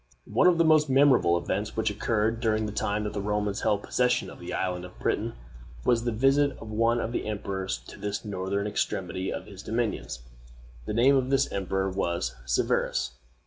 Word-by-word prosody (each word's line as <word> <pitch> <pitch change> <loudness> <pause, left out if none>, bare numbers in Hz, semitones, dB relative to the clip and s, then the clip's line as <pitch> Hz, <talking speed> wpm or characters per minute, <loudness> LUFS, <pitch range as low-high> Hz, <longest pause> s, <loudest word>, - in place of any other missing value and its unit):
One - - +3
of 180 -2 +5
the 165 - +4
most 155 -2 +5
memorable 130 -10 +5
events 100 +6 -3
which 110 -1 +1
occurred 110 +2 0
during 110 -1 +1
the 105 - -3
time 105 0 -1
that 105 - -3
the 100 - -2
Romans 105 0 -1
held 100 -1 +1
possession 125 0 +1
of - - -12
the - - -7
island 90 -1 -2
of 90 - -11
Britain - - -1 0.5
was 120 -1 +2
the 120 - +1
visit 135 +5 +3
of 110 - -9
one 115 +2 +2
of 115 - -2
the 120 - -2
emperors 95 - -3
to - - -11
this 105 +1 -3
northern 100 0 -2
extremity 95 -3 -2
of - - -5
his 100 -2 -10
dominions. 110 - -2 0.6
The 105 - -2
name 130 +4 +5
of 130 -1 +1
this 135 0 +2
emperor 95 0 -1
was 85 -2 -1
Severus. 65 +1 +1
105 Hz, 190 wpm, -27 LUFS, 95-120 Hz, 0.6 s, of